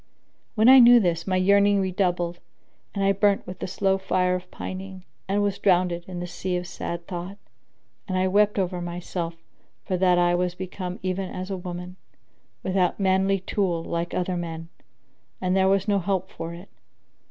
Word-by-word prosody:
When 220 +1 +4
I 265 +1 +10
knew 240 0 +8
this, 170 -4 0
my 185 - +1
yearning 200 +2 +4
redoubled 180 -2 -1 0.6
and 200 - 0
I 195 - +4
burnt 200 0 +2
with 185 0 -8
the - - -4
slow 195 +1 0
fire 185 -1 +1
of 180 0 -4
pining 185 0 -7 0.2
and 200 +1 +1
was 200 -1 -1
drowned 180 -2 +3
in 175 +1 -6
the 175 - -4
sea 180 +1 -3
of 180 - -4
sad 170 0 -5
thought; 180 +2 -6 0.7
and 185 -2 -1
I 185 0 +2
wept 210 +2 +3
over 180 -2 -1
myself 175 -1 -4 0.5
for 185 - -1
that 180 -1 +3
I 175 0 +3
was 180 0 0
become 185 0 -5
even 185 0 -2
as 185 +1 -6
a - - -1
woman, 180 0 -7 0.7
without 185 0 +1
manly 190 0 +2
tool 185 -4 -1
like 170 +1 -3
other 180 0 -1
men, 165 -1 -6 0.7
and 185 0 0
there 190 0 +3
was 195 0 +2
no 200 -1 +2
help 190 0 -2
for 165 0 -6
it. 175 +3 -11
185 Hz, 180 wpm, -25 LUFS, 175-195 Hz, 0.7 s, I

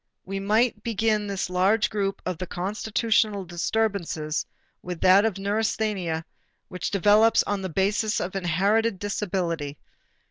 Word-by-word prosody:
We 195 +1 -4
might 215 +3 +1
begin 215 -1 0
this 195 -1 -2
large 195 +5 +2
group 195 -2 -2
of 180 -3 -3
the 185 - -4
constitutional 210 +2 0
disturbances 175 -4 -2 0.3
with 180 -2 -6
that 195 +2 +5
neurasthenia 200 -5 -1 0.4
which 180 -1 -3
develops 210 +3 +4
on 205 -1 -2
the 190 - -4
basis 205 +5 0
of 185 +2 -4
inherited 195 +5 +1
disability. 175 -7 -2
195 Hz, 120 wpm, -25 LUFS, 180-215 Hz, 0.4 s, that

